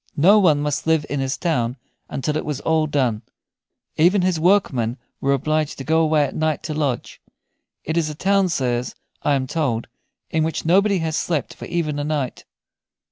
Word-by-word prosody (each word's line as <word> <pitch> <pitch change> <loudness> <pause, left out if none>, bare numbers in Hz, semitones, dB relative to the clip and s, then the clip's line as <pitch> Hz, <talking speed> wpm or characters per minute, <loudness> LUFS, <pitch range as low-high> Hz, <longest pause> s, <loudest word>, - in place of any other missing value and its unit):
No 195 +8 +6
one 155 -7 +4
must 150 +1 -2
live 160 -2 +2
in 145 - -1
his 135 0 -1
town 125 -8 -1 0.3
until 150 +3 -2
it 155 - -1
was 150 -3 -3
all 160 -1 +1
done. 125 -7 0 0.8
Even 180 +4 +4
his 180 -3 +1
workmen 145 - +2 0.2
were 140 - +1
obliged 155 +2 0
to 135 - -6
go 160 +3 +2
away 155 -2 +3
at 140 - -3
night 155 -1 -1
to 155 - -3
lodge. 145 -5 -2 0.6
It 160 - -3
is 160 -2 +1
a 150 - -6
town, 195 +3 +2
sirs, 125 -5 -1 0.3
I 145 - +2
am 130 -1 -1
told, 130 -6 -1 0.5
in 160 -1 +1
which 160 0 -2
nobody 195 +4 +4
has 160 -1 -1
slept 155 -7 -1
for - - -9
even 160 -4 -2
a - - -1
night. 145 -4 -3
155 Hz, 190 wpm, -21 LUFS, 140-165 Hz, 0.8 s, No